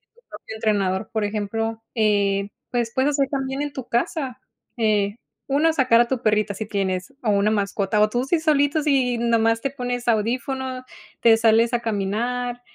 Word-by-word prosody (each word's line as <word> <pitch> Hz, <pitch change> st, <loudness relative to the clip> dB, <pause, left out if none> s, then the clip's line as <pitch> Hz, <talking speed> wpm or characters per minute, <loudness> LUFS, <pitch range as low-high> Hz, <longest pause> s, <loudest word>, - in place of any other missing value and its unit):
tu 475 Hz, -, -25 dB
propio 220 Hz, -, -9 dB
entrenador, 205 Hz, -2 st, 0 dB
por 220 Hz, -1 st, -1 dB
ejemplo. 225 Hz, +2 st, -3 dB
Eh, 200 Hz, -2 st, +1 dB, 0.2 s
pues 240 Hz, -2 st, -1 dB
puedes 260 Hz, +2 st, +2 dB
hacer 275 Hz, -1 st, +1 dB
también 270 Hz, 0 st, -2 dB
en 290 Hz, -1 st, -5 dB
tu 260 Hz, -3 st, -7 dB
casa. 255 Hz, +1 st, -2 dB, 0.4 s
Eh, 210 Hz, -3 st, +1 dB, 0.3 s
una 300 Hz, +4 st, +2 dB
sacar 255 Hz, -6 st, +4 dB
a 240 Hz, -, +1 dB
tu 255 Hz, -1 st, -2 dB
perrita 215 Hz, -1 st, +1 dB
si 215 Hz, +2 st, -5 dB
tienes 190 Hz, -2 st, -2 dB
o 215 Hz, -, +2 dB
una 200 Hz, +1 st, +2 dB
mascota 200 Hz, 0 st, 0 dB
o 210 Hz, -, +5 dB
tú 245 Hz, +3 st, -1 dB
sí 325 Hz, +4 st, +1 dB
solito, 300 Hz, -1 st, +2 dB
si 265 Hz, -5 st, +2 dB
nada 235 Hz, -1 st, +2 dB
más 225 Hz, 0 st, +2 dB
te 275 Hz, -, -2 dB
pones 245 Hz, -2 st, -4 dB
audífono, 255 Hz, +3 st, -1 dB, 0.4 s
te 230 Hz, -1 st, +6 dB
sales 230 Hz, +1 st, +3 dB
a 240 Hz, -, +2 dB
caminar 235 Hz, +4 st, -2 dB
230 Hz, 180 wpm, -23 LUFS, 210-260 Hz, 0.4 s, te